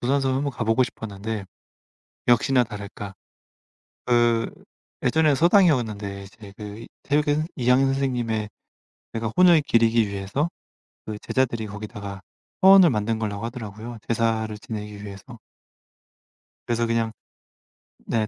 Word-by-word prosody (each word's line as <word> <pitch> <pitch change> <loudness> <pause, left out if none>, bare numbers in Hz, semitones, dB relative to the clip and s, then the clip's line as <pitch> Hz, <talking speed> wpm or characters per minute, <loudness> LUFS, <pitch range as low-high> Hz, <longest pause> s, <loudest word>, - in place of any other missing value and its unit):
도산서원 135 +1 +1
한번 140 +1 -1
가 115 - -3
보고 115 +3 +3
싶었는데 110 -3 -5 0.8
역시나 125 +1 +4
다를까. 100 -2 -8 0.9
그 120 -1 +2 0.5
예전에 155 +4 +3
서당이었는데 120 - +2
이제 100 +1 -13
그 105 +2 -8 0.2
퇴계 150 +1 +1
이황 125 +1 +3
선생님의 120 -6 -1 0.6
내가 115 0 -3
혼을 175 -3 +7
기리기 115 -5 +3
위해서 100 +10 -2 0.6
그 110 -1 -5
제자들이 115 -4 -1
거기다가 105 -1 -7 0.4
화원을 190 -2 +8
만든 110 -2 -1
거라고 105 0 -3
하더라고요 115 -1 -7
제사를 110 -2 0
지내기 105 -3 -7
위해서. 105 +4 -10 1.3
그래서 120 0 0
그냥 115 -1 0 0.9
네. 110 -2 0
115 Hz, 285 characters per minute, -24 LUFS, 105-130 Hz, 1.3 s, 화원을